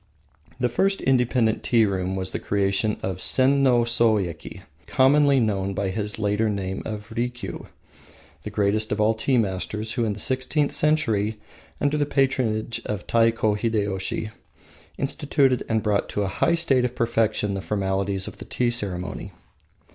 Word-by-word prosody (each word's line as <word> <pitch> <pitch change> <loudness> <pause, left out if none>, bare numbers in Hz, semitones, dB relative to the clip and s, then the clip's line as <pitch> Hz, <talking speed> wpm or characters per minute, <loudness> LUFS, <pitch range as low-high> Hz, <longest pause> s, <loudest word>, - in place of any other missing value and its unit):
The 125 - +2
first 195 +11 +1
independent 125 -3 +2
tea 115 -2 +3
room 95 -1 -2
was 95 -1 -3
the - - -3
creation 100 +1 0
of 95 -2 -3
Senno 130 0 +3
Soyeki, 110 -8 0 0.3
commonly 140 +1 +4
known 100 -4 -1
by 100 0 -1
his 105 +1 -3
later 105 +1 0
name 95 -2 -3
of 105 +1 -6
Rikiu, 120 +1 -4 0.7
the 105 - -6
greatest 105 +1 0
of 105 - -1
all 110 +1 +3
tea 125 +4 0
masters, 105 +1 -2
who, 120 0 -1
in 110 -2 0
the 105 - -8
sixteenth 130 +5 0
century, 110 -9 +1 0.4
under 145 +1 +1
the 145 - +1
patronage 125 -5 0
of 105 -1 -4
Taiko 115 -2 +2
Hideyoshi, 105 -1 -1 0.7
instituted 140 -2 +1
and 110 -1 +1
brought 105 -2 0
to 105 - -1
a - - -1
high 165 - +1
state 135 -7 +3
of 125 0 -2
perfection 110 -3 0
the 95 - -3
formalities 95 -1 -1
of - - -9
the - - -8
Tea 120 -1 0
ceremony. 95 -6 -4
110 Hz, 155 wpm, -24 LUFS, 100-125 Hz, 0.7 s, commonly